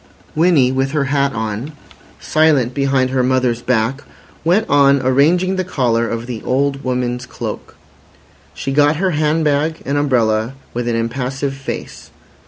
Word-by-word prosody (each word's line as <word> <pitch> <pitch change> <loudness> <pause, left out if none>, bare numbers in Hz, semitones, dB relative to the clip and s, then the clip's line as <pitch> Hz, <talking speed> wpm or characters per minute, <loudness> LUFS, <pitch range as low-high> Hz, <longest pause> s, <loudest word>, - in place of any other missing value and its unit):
Winnie, 155 -6 +3
with 135 +1 -1
her 150 -2 +1
hat 140 0 +1
on, 110 +6 -4 0.5
silent 150 -6 +2
behind 135 -2 +1
her 130 -1 +1
mother's 125 -2 +1
back, 125 +3 0 0.4
went 180 +7 +2
on 140 -1 +4
arranging 165 +9 +2
the 185 - 0
collar 120 -9 0
of 115 0 -4
the 120 -3 -6
old 140 +1 -1
woman's 125 -1 -2
cloak. - - -7 0.8
She 135 - -4
got 145 +2 +3
her 185 +4 0
hand 155 +1 +1
bag, 150 +2 0
an 140 +1 -1
umbrella, 115 -4 +1 0.2
with 120 0 -3
an 120 - 0
impassive 130 +4 -2
face. 135 -1 -7
135 Hz, 150 wpm, -17 LUFS, 125-145 Hz, 0.8 s, on